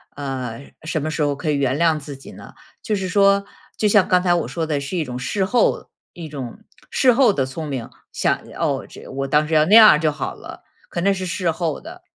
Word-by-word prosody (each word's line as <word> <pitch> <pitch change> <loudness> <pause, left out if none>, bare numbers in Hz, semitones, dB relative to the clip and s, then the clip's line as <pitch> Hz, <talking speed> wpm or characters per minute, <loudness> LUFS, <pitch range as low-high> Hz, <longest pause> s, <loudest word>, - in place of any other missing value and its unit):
呃， 135 -3 -6
什 155 -1 -2
么 155 +2 -3
时 155 - -3
候 145 -1 +1
可 155 +2 -2
以 145 - 0
原 135 -1 0
谅 160 -1 +2
自 140 -1 -9
己 135 - -13
呢？ - - -13 0.3
就 215 - -1
是 190 -1 -3
说， 200 +1 +3 0.3
就 215 - +2
像 205 -2 +4
刚 180 -1 +3
才 175 -1 +3
我 175 - 0
说 165 -2 -3
的 150 -2 -1
是 175 +6 -4
一 165 - 0
种 125 -3 -6
事 190 +10 -1
后 235 +3 +1 0.2
一 170 -2 -8
种 140 - -7 0.3
事 255 -2 +3
后 240 -4 +4
的 135 -2 0
聪 150 +4 -6
明， 130 -5 -5 0.2
想 - - 0 0.2
哦， - - -1 0.3
我 135 - -2
当 150 +2 +2
时 160 - -4
要 155 -1 +5
那 200 +6 +5
样 215 -9 +9
就 155 -2 +2
好 145 - -5
了。 - - -12 0.3
可 170 - -3
那 200 +2 +3
是 190 -1 -4
事 175 -1 -1
后 160 -2 -3
的， 360 +3 -12
160 Hz, 250 characters per minute, -21 LUFS, 140-190 Hz, 0.3 s, 样